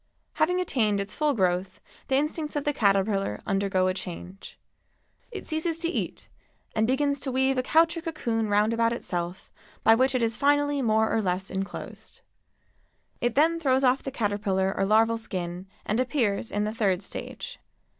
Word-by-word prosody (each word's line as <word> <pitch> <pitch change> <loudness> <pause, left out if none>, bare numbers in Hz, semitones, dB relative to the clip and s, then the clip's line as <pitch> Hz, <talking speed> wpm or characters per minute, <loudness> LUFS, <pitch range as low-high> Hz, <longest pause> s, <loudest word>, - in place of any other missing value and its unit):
Having 360 +4 +1
attained 225 - +1
its 200 0 -3
full 300 -2 +1
growth 185 -1 0 0.3
the 265 - +1
instincts 300 +2 -1
of 290 - -1
the 295 - 0
caterpillar 195 - +1
undergo 195 -2 +1
a 185 - +2
change. 185 +1 -8 0.7
It 415 -5 -7
ceases 315 +1 -2
to 335 0 -1
eat - - -4 0.5
and 220 0 +2
begins 280 +2 +1
to 265 - -3
weave 265 +1 +2
a - - +3
couch 325 +6 +3
or 335 - -4
cocoon 235 -10 -2
round 210 +2 +3
about 230 0 +2
itself 180 -5 -4 0.3
by 225 - +7
which 260 +3 +2
it 250 - +1
is 225 -1 +1
finally 290 0 +2
more 220 -2 +2
or 225 - +2
less 185 -1 -2
enclosed. 195 +1 -6 1.0
It 240 -1 0
then 325 +4 +3
throws 265 -4 +2
off 255 +1 +3
the - - -4
caterpillar 205 -5 0
or - - +1
larval 225 +2 +3
skin 180 -3 -5 0.2
and 215 +3 0
appears 240 -5 0
in 205 +1 0
the 215 +1 -2
third 200 -5 +1
stage. 485 - -7
225 Hz, 175 wpm, -27 LUFS, 195-280 Hz, 1.0 s, by